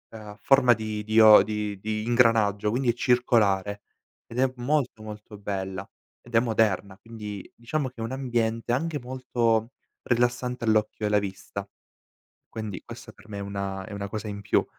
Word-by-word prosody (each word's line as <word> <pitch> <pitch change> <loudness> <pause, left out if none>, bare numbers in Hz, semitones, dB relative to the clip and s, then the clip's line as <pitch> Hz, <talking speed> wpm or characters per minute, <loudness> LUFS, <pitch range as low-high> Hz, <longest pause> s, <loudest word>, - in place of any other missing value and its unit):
a 105 -1 -10
forma 125 -3 +5
di 110 -1 -4
dio 110 -1 +8
di 105 -1 -3
di 110 +1 -3
ingranaggio, 115 -4 +3
quindi 120 +3 0
è - - -7
circolare 105 -5 +2 0.5
ed 120 +2 -5
è 130 0 +4
molto 125 -3 0
molto 105 0 -9
bella, 95 -2 -4 0.3
ed 120 -1 -9
è 115 - +8
moderna, 110 -4 +1
quindi 105 -3 -8
diciamo 130 +3 -3
che 130 - -28
è 115 - -6
un 115 +2 -3
ambiente 120 -3 -1
anche 155 +5 0
molto 120 -2 0 0.3
rilassante 125 0 0
all'occhio 110 -1 +1
e - - +2
alla 105 - +4
vista. 100 0 -6 0.8
Quindi 110 -3 -6
questa - - -10
per - - -20
me 100 -1 -6
è - - -4
una 100 -1 -4
è 110 - -10
una 100 0 -4
cosa 110 +1 -5
in 100 0 -6
più. 100 - +2
110 Hz, 170 wpm, -26 LUFS, 105-120 Hz, 0.8 s, dio